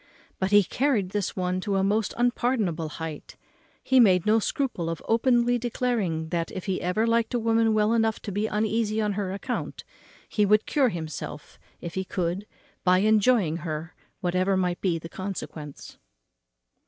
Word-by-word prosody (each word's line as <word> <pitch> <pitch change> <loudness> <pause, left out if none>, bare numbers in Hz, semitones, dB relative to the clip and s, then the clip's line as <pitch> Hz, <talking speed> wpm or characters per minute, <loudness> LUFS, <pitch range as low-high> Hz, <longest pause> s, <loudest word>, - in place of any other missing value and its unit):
But 190 - 0
he 205 0 +6
carried 230 -2 0
this 205 -2 -2
one 185 0 -1
to 200 0 -1
a 190 - +2
most 210 +2 0
unpardonable 235 -9 0
height; 160 -1 -7 0.5
and 260 -2 +8
made 180 -5 +4
no 215 +1 +4
scruple 220 -8 -2
of 165 -2 -3
openly 240 +1 +3
declaring 220 -9 -1
that, 170 -1 -2
if 185 - -6
he 190 -2 -1
ever 180 +6 +1
liked 230 +1 +1
a - - +2
woman 225 0 +2
well 215 +1 +3
enough 225 -1 +1
to 205 - -4
be 205 +3 -1
uneasy 220 0 0
on 210 -1 0
her 195 -2 -2
account, 240 +6 -4 0.4
he 210 - +1
would 210 +1 +4
cure 275 -4 +2
himself, 155 -4 -7 0.2
if 170 -1 -6
he 190 - -2
could, 185 +2 -3 0.4
by 180 0 +5
enjoying 210 -4 +3
her, 160 -1 -5 0.3
whatever 185 +2 +1
might 180 -1 -1
be 180 -4 +1
the 165 - -8
consequence. 165 -6 -7
200 Hz, 165 wpm, -26 LUFS, 180-225 Hz, 0.5 s, and